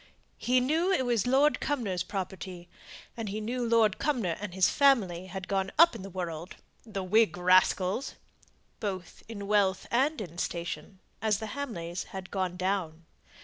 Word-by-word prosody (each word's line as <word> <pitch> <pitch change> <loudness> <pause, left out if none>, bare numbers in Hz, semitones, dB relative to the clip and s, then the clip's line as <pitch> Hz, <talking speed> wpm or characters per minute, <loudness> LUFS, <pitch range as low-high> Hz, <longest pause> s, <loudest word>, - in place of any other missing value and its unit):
He 255 +1 +3
knew 315 +8 +1
it 310 -9 +2
was 240 -3 +1
Lord 275 +4 +4
Cumnor's 220 -11 -1
property; 185 -2 -5 0.5
and 225 -3 -4
he 210 +2 -3
knew 240 +3 -2
Lord 230 -3 +3
Cumnor 230 - 0
and 210 -3 -4
his 190 -2 +5
family 195 -11 +3
had 190 0 -6
gone 195 -1 -1
up 335 +1 +7
in - - -7
the 195 - -7
world 175 -2 -5 0.3
("the 200 -4 -5
Whig 200 -2 +3
rascals!"), 185 +5 +3 0.6
both 190 -4 -5
in 200 -3 -6
wealth 200 -2 +2
and 275 +5 +2
in 175 -4 -7
station, 170 +2 -4 0.2
as 215 -2 +2
the 220 0 -6
Hamleys 185 -11 -4
had 190 -1 -8
gone 185 -2 -2
down. 180 -4 -2
195 Hz, 160 wpm, -29 LUFS, 180-235 Hz, 0.6 s, up